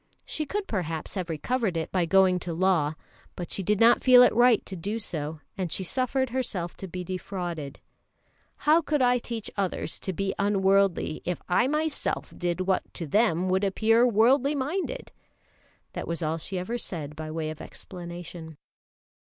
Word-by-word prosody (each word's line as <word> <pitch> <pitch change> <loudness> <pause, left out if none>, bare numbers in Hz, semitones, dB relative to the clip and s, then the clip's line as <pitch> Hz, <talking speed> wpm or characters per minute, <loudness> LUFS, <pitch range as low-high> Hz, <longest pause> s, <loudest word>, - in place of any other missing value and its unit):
She 305 -1 -3
could, 410 +5 -2
perhaps, 165 -6 -3
have 185 -4 -3
recovered 195 +4 -1
it 160 - -3
by 180 -3 +1
going 185 0 +4
to 175 -2 -5
law, 165 -4 +2 0.4
but 175 - -6
she - - -1
did 205 +2 +1
not 235 +1 +5
feel 250 -1 +8
it - - +5
right 240 -1 +4
to 190 - -6
do 200 +6 -3
so, 155 -7 -4
and 185 -4 -3
she 190 - -1
suffered 255 +5 0
herself 200 -9 -2
to 190 - -6
be 180 +1 -5
defrauded. 175 -5 -5 0.8
"How 310 +3 +4
could 295 -4 +1
I 245 0 +4
teach 230 -2 -5
others 190 -4 -2
to 190 - -3
be 195 +2 -2
unworldly 195 -4 +2
if 180 0 -2
I 215 +8 +3
myself 305 +1 -2
did 175 0 -2
what 185 0 0
to 170 - -4
them 185 +1 +2
would 190 +2 +2
appear 220 +4 +3
worldly 250 +6 +4
minded?" 365 - -3 0.8
That - - -5
was 170 0 -3
all 160 +1 -1
she 185 +4 -4
ever 225 +7 -3
said 150 -8 -5
by 155 0 -6
way 155 0 -3
of 155 - -9
explanation. 170 -3 -8
190 Hz, 175 wpm, -27 LUFS, 170-235 Hz, 0.8 s, feel